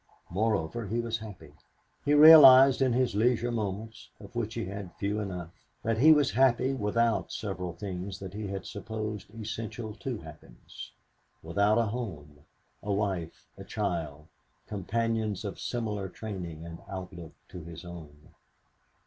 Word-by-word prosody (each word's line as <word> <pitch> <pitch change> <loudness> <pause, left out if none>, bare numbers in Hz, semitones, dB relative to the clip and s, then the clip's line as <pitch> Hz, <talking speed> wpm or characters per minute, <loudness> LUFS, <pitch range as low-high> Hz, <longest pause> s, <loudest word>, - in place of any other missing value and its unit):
Moreover, 105 +1 -1
he 115 +5 -1
was 115 -1 -2
happy. 105 -4 -11 0.5
He 145 0 +3
realized 135 -4 +9
in 130 -1 +3
his 125 -2 +1
leisure 120 +3 +2
moments, 105 -1 -4
of 100 +3 -13
which 115 -1 -3
he 115 - -2
had 100 -1 -7
few 105 +1 -2
enough, 90 -5 -5 0.3
that 115 0 0
he 155 +5 +8
was 150 -3 +4
happy 130 +1 +3
without 115 0 0
several 90 -4 -4
things 95 +2 -6
that 95 -1 -8
he 105 0 -5
had 95 -1 -5
supposed 110 0 -5
essential 110 +1 -5
to 105 -2 -5
happiness - - -12 0.5
without 100 +6 +2
a 115 - +3
home, 90 -11 -6 0.4
a 105 - -3
wife, 95 -5 -2
a - - -7
child, 80 -8 -3 0.4
companions 110 +1 -2
of 100 - -5
similar 105 -5 -3
training 90 -7 -7
and 85 0 -8
outlook 90 -3 -8 0.2
to 90 - -9
his 85 +1 -10
own. 80 -2 -11
105 Hz, 145 wpm, -29 LUFS, 90-115 Hz, 0.5 s, realized